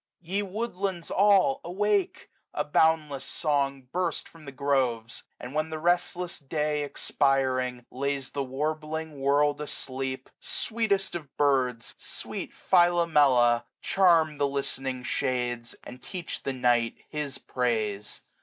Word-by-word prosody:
75 175 Hz, +2 st, -9 dB
Ye 205 Hz, -, +3 dB
woodlands 195 Hz, -3 st, -3 dB
all, 205 Hz, +7 st, +4 dB
awake: 200 Hz, +1 st, 0 dB, 0.2 s
a 150 Hz, -, +1 dB
boundless 150 Hz, -2 st, +2 dB
song 140 Hz, -2 st, 0 dB
Burst 175 Hz, -3 st, -1 dB
from 165 Hz, -2 st, -16 dB
the 140 Hz, -, -7 dB
groves! 130 Hz, -4 st, 0 dB, 0.2 s
and 125 Hz, +2 st, -8 dB
when 155 Hz, +1 st, 0 dB
the 160 Hz, -, -4 dB
restless 175 Hz, +1 st, 0 dB
day. 150 Hz, +1 st, -1 dB
Expiring, 130 Hz, -3 st, 0 dB
lays 140 Hz, 0 st, -2 dB
the 140 Hz, -, -2 dB
warbling 155 Hz, +2 st, -3 dB
world 145 Hz, +2 st, +2 dB
asleep. 130 Hz, -2 st, -4 dB
Sweetest 225 Hz, -, 0 dB
of 155 Hz, -6 st, -7 dB
birds! 130 Hz, -5 st, +1 dB
sweet -, -, -6 dB
Philomela, 150 Hz, -10 st, +4 dB, 0.2 s
charm 165 Hz, -6 st, +3 dB
The 145 Hz, -, +3 dB
listening 135 Hz, -2 st, -3 dB
shades, 120 Hz, -2 st, -1 dB
and 125 Hz, +1 st, -10 dB
teach 175 Hz, +4 st, -5 dB
the 135 Hz, -, -2 dB
night 120 Hz, -2 st, +2 dB
His 150 Hz, -3 st, -4 dB
praise. 110 Hz, -5 st, -2 dB
145 Hz, 125 wpm, -28 LUFS, 130-170 Hz, 0.2 s, all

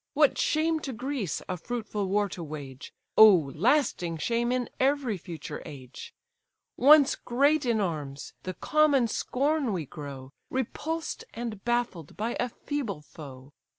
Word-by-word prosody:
What 295 Hz, -1 st, +4 dB
shame 315 Hz, +1 st, +2 dB
to 275 Hz, -3 st, -5 dB
Greece 245 Hz, -, -3 dB
a 185 Hz, -, -3 dB
fruitful 210 Hz, 0 st, -3 dB
war 205 Hz, +1 st, +2 dB
to 180 Hz, -, -7 dB
wage, 145 Hz, -4 st, -8 dB, 0.3 s
Oh, 185 Hz, -10 st, +8 dB
lasting 185 Hz, -, +1 dB
shame 235 Hz, +7 st, 0 dB
in 250 Hz, -1 st, 0 dB
every 270 Hz, -4 st, +2 dB
future 165 Hz, -4 st, -7 dB
age! 140 Hz, -, -10 dB, 0.6 s
Once 290 Hz, +1 st, +7 dB
great 280 Hz, +3 st, +2 dB
in 230 Hz, -2 st, +2 dB
arms, 150 Hz, -7 st, -4 dB
the 185 Hz, -1 st, -5 dB
common 295 Hz, -5 st, +3 dB
scorn 275 Hz, +3 st, 0 dB
we 170 Hz, -5 st, -2 dB
grow, 135 Hz, -2 st, -8 dB, 0.2 s
Repulsed 320 Hz, +6 st, -3 dB
and 225 Hz, -4 st, -5 dB
baffled 240 Hz, -10 st, -2 dB
by 225 Hz, +3 st, -2 dB
a 245 Hz, -, 0 dB
feeble 235 Hz, -, -4 dB
foe. 140 Hz, -2 st, -12 dB
225 Hz, 140 wpm, -28 LUFS, 160-275 Hz, 0.6 s, Oh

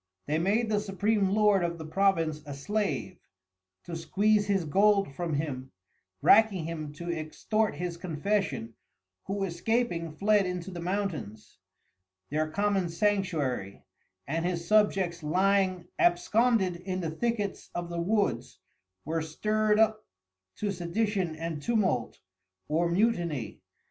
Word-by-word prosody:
They 155 Hz, +2 st, 0 dB
made 210 Hz, +7 st, +1 dB
the 210 Hz, -1 st, +2 dB
supream 205 Hz, 0 st, +1 dB
Lord 205 Hz, -2 st, +3 dB
of 170 Hz, 0 st, -2 dB
the 160 Hz, -, -7 dB
Province 165 Hz, -3 st, +1 dB
a 145 Hz, -, -5 dB
Slave, 145 Hz, -, -2 dB, 0.6 s
to 170 Hz, -, -6 dB
squeeze 205 Hz, +5 st, +2 dB
his 195 Hz, -4 st, +1 dB
Gold 195 Hz, 0 st, +3 dB
from 165 Hz, 0 st, -2 dB
him, 135 Hz, -3 st, -3 dB, 0.5 s
racking 205 Hz, -6 st, +5 dB
him 155 Hz, -3 st, -5 dB
to 170 Hz, +3 st, -5 dB
extort 205 Hz, +7 st, -1 dB
his 175 Hz, +2 st, -4 dB
confession 170 Hz, -, -2 dB, 0.5 s
who 195 Hz, 0 st, -2 dB
escaping 180 Hz, -1 st, -1 dB
fled 200 Hz, +4 st, +2 dB
into 180 Hz, +1 st, -4 dB
the 175 Hz, -, -6 dB
Mountains, 170 Hz, -, -4 dB, 0.7 s
their 155 Hz, +1 st, 0 dB
common 200 Hz, -1 st, 0 dB
Sanctuary, 165 Hz, -, -1 dB, 0.4 s
and 165 Hz, +4 st, -2 dB
his 170 Hz, -1 st, -2 dB
Subjects 195 Hz, -5 st, +2 dB
lying 185 Hz, +2 st, +2 dB
absconded 190 Hz, +2 st, +3 dB
in 185 Hz, +1 st, -4 dB
the 165 Hz, -2 st, -2 dB
Thickets 210 Hz, +2 st, -2 dB
of 175 Hz, 0 st, -3 dB
the 170 Hz, 0 st, -2 dB
Woods, 205 Hz, +3 st, 0 dB, 0.5 s
were 160 Hz, +2 st, -1 dB
stir'd 210 Hz, +7 st, +1 dB
up 220 Hz, -1 st, +3 dB, 0.5 s
to 205 Hz, -1 st, -2 dB
Sedition 185 Hz, -1 st, -1 dB
and 160 Hz, -1 st, -4 dB
Tumult 185 Hz, -, 0 dB, 0.5 s
or 170 Hz, +3 st, +1 dB
Mutiny. 170 Hz, -, 0 dB
180 Hz, 130 wpm, -29 LUFS, 160-205 Hz, 0.7 s, racking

